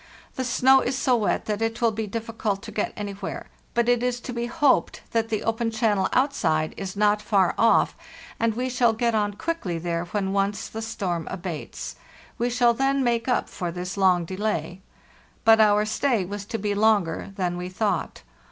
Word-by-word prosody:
The 260 - -2
snow 260 +2 +5
is 260 +1 -1
so 255 -2 +3
wet 220 -3 0
that 210 0 -2
it 225 +1 -1
will 230 -1 +3
be 220 0 -3
difficult 220 -2 -3
to - - -8
get 210 - -1
anywhere; 200 -1 -5 0.3
but 235 0 +2
it 245 -1 +3
is 250 0 0
to 245 - -6
be 235 0 -2
hoped 280 +3 +2
that 225 -1 0
the 215 - -1
open 225 +1 0
channel 220 -3 +1
outside 165 - +1
is 190 0 -6
not 210 0 +3
far 200 -4 +2
off, 225 -2 +3 0.4
and 230 -1 +1
we 250 +2 -1
shall 245 -2 +2
get 235 +1 0
on 205 -1 +1
quickly 205 - -3
there 170 0 -2
when 195 +1 -2
once 200 +2 0
the 225 - -6
storm 180 -7 -3
abates. 170 -4 -6 0.4
We 240 +1 +1
shall 240 -1 +3
then 270 +2 +1
make 235 -1 0
up 250 - +1
for 175 -2 -4
this 180 +2 -5
long 185 -3 +3
delay." 185 -2 -3 0.6
But 225 0 +7
our 210 0 +4
stay 220 -2 0
was 200 +2 -6
to 225 +2 -3
be 205 -1 -1
longer 205 -5 +1
than 180 -3 -1
we 180 +1 -5
thought. 205 +3 -2
215 Hz, 190 wpm, -25 LUFS, 195-235 Hz, 0.6 s, But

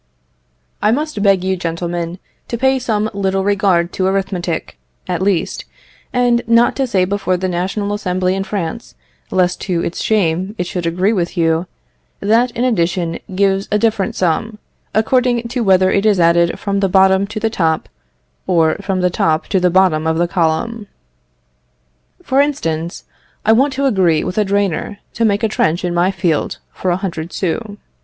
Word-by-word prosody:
I 210 - +3
must 295 -3 -2
beg 195 -3 +3
you, 190 0 0
gentlemen, 170 0 -3 0.3
to 235 - -3
pay 265 +2 +2
some 220 -4 0
little 195 -1 0
regard 190 -3 +1
to 185 - 0
arithmetic, 185 - -2 0.3
at 180 -1 -2
least; 190 -3 0 0.5
and 245 -1 +2
not 230 +1 +4
to 270 -1 0
say 190 -6 +2
before 190 -1 -1
the 185 +1 -2
National 190 +3 -2
Assembly 185 -2 -1
in 195 0 -2
France, 195 +1 -5 0.3
lest 180 -1 +1
to 175 -4 -1
its 170 - -3
shame 190 -1 0
it 180 - -1
should 175 -1 -3
agree 180 +6 +1
with 180 -2 -2
you, 165 +1 +1 0.5
that 230 +5 +2
an 240 - 0
addition 175 -7 0 0.2
gives 195 0 +1
a 210 - +3
different 210 -3 0
sum, 200 +5 -1 0.4
according 240 +1 +2
to 245 0 -1
whether 190 -2 +4
it 200 +2 +2
is 205 -3 +3
added 170 0 +4
up - - -8
from 200 -1 -2
the 195 -1 +1
bottom 190 +1 +4
to 210 +1 -5
the 220 0 -1
top, 160 -6 0 0.6
or 165 -4 +2
from 195 -2 -1
the 180 0 +2
top 160 -2 +1
to 190 - +2
the 180 0 +3
bottom 175 -4 +3
of 160 0 +1
the 175 +1 +1
column. 180 +6 -1 1.4
For 270 +1 +3
instance, 170 - -2 0.4
I 220 - +5
want 265 +6 +4
to 275 +1 -1
agree 185 - +2
with 185 - -2
a 210 - +2
drainer 200 0 -1 0.2
to 230 - 0
make 205 0 +1
a - - +4
trench 175 -4 0
in 175 - -1
my 175 +2 +2
field 170 -5 -1 0.2
for 185 - -2
a 175 - +1
hundred 170 -3 -5
sous. 205 +3 -3
190 Hz, 180 wpm, -17 LUFS, 175-215 Hz, 1.4 s, I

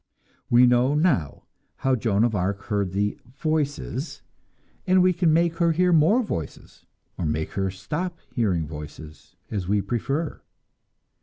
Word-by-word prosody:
We 120 +1 +6
know 125 +3 +3
now 145 - +1 0.3
how 135 -1 +1
Joan 110 -3 +1
of 120 -1 +2
Arc 100 +1 -1
heard 100 -3 -1
the 100 +2 -1 0.2
"voices," 150 -2 -2 0.6
and 185 0 +5
we 185 0 +4
can 170 -2 +2
make 170 +1 +2
her 170 -2 +3
hear 180 +2 +3
more 175 +11 +4
voices 80 - -7 0.3
or 90 - -1
make 75 +1 -2
her 95 -1 -1
stop 150 - -4 0.2
hearing 95 -9 0
voices, 75 0 -10 0.2
as 100 -4 -3
we 105 +2 +2
prefer. 135 +9 -2
120 Hz, 145 wpm, -24 LUFS, 95-160 Hz, 0.6 s, We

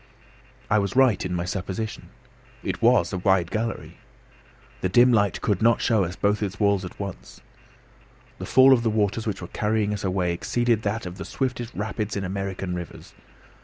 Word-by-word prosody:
I 105 - +3
was 100 +1 -2
right 130 -5 +4
in 90 -1 -3
my 85 0 -2
supposition. 95 +3 -5 0.5
It - - -3
was 115 -7 +3
a 95 - -2
wide 95 -2 +2
gallery. 110 +1 -4 0.8
The 95 - 0
dim 120 +6 +5
light 100 -3 +2
could 100 -4 0
not 115 +1 +4
show 110 -4 +2
us 90 +2 -6
both 105 +1 0
its 100 -1 -3
walls 100 -2 +2
at 90 - -9
once. 100 -3 -7 1.0
The - - -6
fall 130 +1 +7
of 125 - +3
the 115 - +1
waters 110 +1 0
which 95 -3 -3
were - - -6
carrying 105 -1 0
us 105 - -5
away 90 -2 0
exceeded 120 +5 0
that 110 +1 -2
of 90 +2 -8
the - - -4
swiftest 125 -3 -3
rapids 105 0 -3
in 100 - -2
American 95 -1 -4
rivers. 90 -1 -8
100 Hz, 185 wpm, -24 LUFS, 95-115 Hz, 1.0 s, fall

